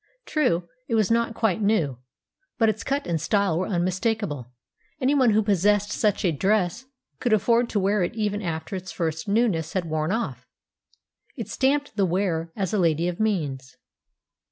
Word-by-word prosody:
True, 175 - +1 0.2
it 230 - 0
was 215 -1 +2
not 230 0 +1
quite 220 -3 +1
new, 170 - +1 0.6
but 225 -2 +4
its 220 +1 -2
cut 280 +3 -1
and 165 -3 -1
style 200 -2 +1
were 185 - -1
unmistakable; 185 - -1 0.5
anyone 265 -1 +3
who 215 0 +3
possessed 205 +1 +2
such 210 -3 +1
a 175 - +3
dress 195 - 0 0.3
could 240 -3 +1
afford 235 +3 +3
to 210 - 0
wear 200 +1 +2
it 175 - -1
even 210 -2 -1
after 165 0 -4
its 185 0 -6
first 160 -1 -3
newness 200 -7 +1
had 185 -3 -1
worn 155 +1 -1
off; 230 +3 -3 0.9
it - - -5
stamped 280 -3 0
the 195 - +3
wearer 170 -2 -1
as 195 0 -2
a 210 - +2
lady 165 -1 +2
of 175 -1 -3
means. 145 -12 -2
200 Hz, 170 wpm, -25 LUFS, 170-220 Hz, 0.9 s, but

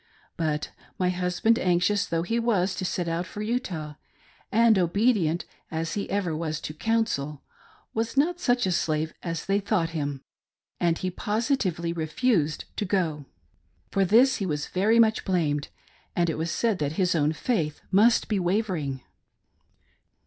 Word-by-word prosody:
But 155 -2 -2 0.3
my 180 -3 +1
husband, 180 +5 +1
anxious 180 +3 +2
though 165 0 0
he 230 +6 0
was 200 -5 +1
to 185 - -3
set 175 -1 -2
out 170 +2 -2
for 210 - -6
Utah, 185 -10 -3 0.6
and 225 -2 +5
obedient, 180 -2 +2 0.2
as 165 +1 -3
he 205 - -3
ever 190 -5 -1
was 155 -1 -2
to 155 - -5
"counsel," 155 -8 -1 0.5
was 225 +3 -2
not 340 +5 +2
such 245 -7 +2
a 185 - +1
slave 155 -2 0
as 165 -2 -4
they 195 +1 +2
thought 190 -5 0
him, 145 -4 -3 0.6
and 170 -1 +2
he 185 - -2
positively 205 - -1
refused 165 - 0
to - - 0
go. 165 -7 -1 0.6
For 195 - +2
this 235 +8 +5
he 200 - -2
was 150 -2 -2
very 210 +5 +2
much 220 -1 +4
blamed, 155 -6 0 0.5
and 170 -1 +2
it - - -4
was 165 +1 -1
said 225 -1 0
that 145 0 -1
his 180 +1 +1
own 150 -2 +2
faith 160 - -1
must 220 +5 +4
be 210 -3 0
wavering. 175 - -1
180 Hz, 155 wpm, -26 LUFS, 160-220 Hz, 0.6 s, and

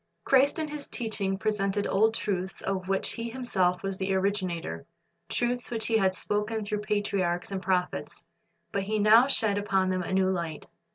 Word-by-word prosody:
Christ 270 +1 +4
in 315 -1 -1
His 295 -1 -4
teaching 205 -5 -2
presented 205 -1 0
old 220 +3 +3
truths 190 -3 -2
of 190 -1 -2
which 195 0 0
He 230 0 -4
Himself 195 -8 0
was 195 -1 -3
the 190 0 0
originator, 185 - -2 0.4
truths 245 0 -1
which 225 -2 -1
He 225 - +1
had 190 -2 +2
spoken 210 +2 -1
through 210 0 -2
patriarchs 200 -4 -1
and 195 -1 -3
prophets; 180 -1 -1 0.5
but 200 - 0
He 215 +3 -1
now 220 +4 +6
shed 220 -7 +1
upon 190 -2 +1
them 185 0 0
a 180 - -5
new 190 0 +3
light. 170 -4 -3
200 Hz, 175 wpm, -28 LUFS, 190-220 Hz, 0.5 s, now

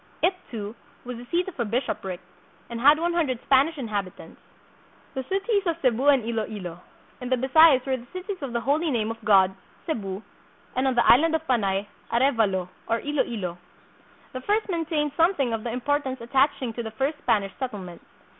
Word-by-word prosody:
It, 370 - +4 0.2
too, 210 -2 -5 0.3
was 250 -1 -5
the 240 - -9
seat 355 +2 +1
of 375 - -8
a - - +2
bishopric, 205 -5 -2 0.5
and 235 0 -4
had 290 +4 +7
one 340 +2 0
hundred 300 -8 +1
Spanish 280 +4 +3
inhabit 205 -7 -4
ants. - - -13 0.7
The 265 - -2
Cities 400 +2 +1
of 335 -1 0
Cebu 255 -1 +1
and 275 -5 +5
Iloilo. 215 -6 -4 0.4
In 250 - -4
the 260 - +3
Bisayas 270 +1 +6
were 265 -1 0
the 245 0 -13
Cities 370 0 -6
of 275 -3 -4
the 235 0 -1
Holy 300 +6 +1
Name 225 -5 0
of 225 0 -9
God 195 -3 +5 0.3
(Cebu), 205 - -3 0.5
and 260 +1 +1
on 260 - +1
the 240 - +3
island 320 +6 +6
of 320 0 -3
Panay, 200 -5 +1 0.3
Arevalo 225 -8 +2 0.2
(or 230 - +1
Iloilo). 225 -12 -2 0.7
The 255 - -5
first 425 +8 0
maintained 320 -4 -1
something 325 -8 +2
of 220 -1 -2
the 240 - -3
importance 260 +2 -1
attaching 260 0 +1
to 235 - -4
the 225 - -5
first 285 +2 -1
Spanish 200 -7 +1
settlement. 200 -10 -6
255 Hz, 185 wpm, -25 LUFS, 220-295 Hz, 0.7 s, had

